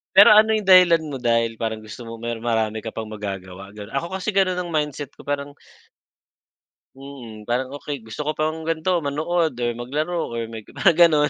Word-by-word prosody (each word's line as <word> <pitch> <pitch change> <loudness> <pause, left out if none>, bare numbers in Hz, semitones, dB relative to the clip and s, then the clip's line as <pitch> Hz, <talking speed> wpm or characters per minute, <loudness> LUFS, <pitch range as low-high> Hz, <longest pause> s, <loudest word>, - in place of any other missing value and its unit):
Pero 200 - +10
ano 215 +1 +6
'yung 210 - -4
dahilan 180 -3 +7
mo 145 -3 -5
dahil 115 -1 +2
parang 110 -1 -2
gusto 110 +3 -9
mo 115 0 -7
mer 115 0 -5
marami 110 -2 0
ka 115 - -5
pang 110 0 -6
magagawa 95 -2 -7
gano'n, 105 -1 -10
ako 170 - -1
kasi 195 +2 -3
gano'n 185 -2 +2
ang 175 -2 -4
mindset 150 -2 -2
ko, - - -14
parang 145 0 -3 1.4
Mm 125 -6 -10
parang 125 +3 -1
okey, 145 -3 -6
gusto 110 +6 -7
ko 155 - +1
pang 155 +1 -2
ganito 165 +2 +1
manood 160 +3 0
or 120 - +1
maglaro 155 +8 -2
or 115 - -2
may 110 -2 -8
mga 175 -4 +2
gano'n, 150 -3 +3
140 Hz, 190 wpm, -22 LUFS, 115-165 Hz, 1.4 s, Pero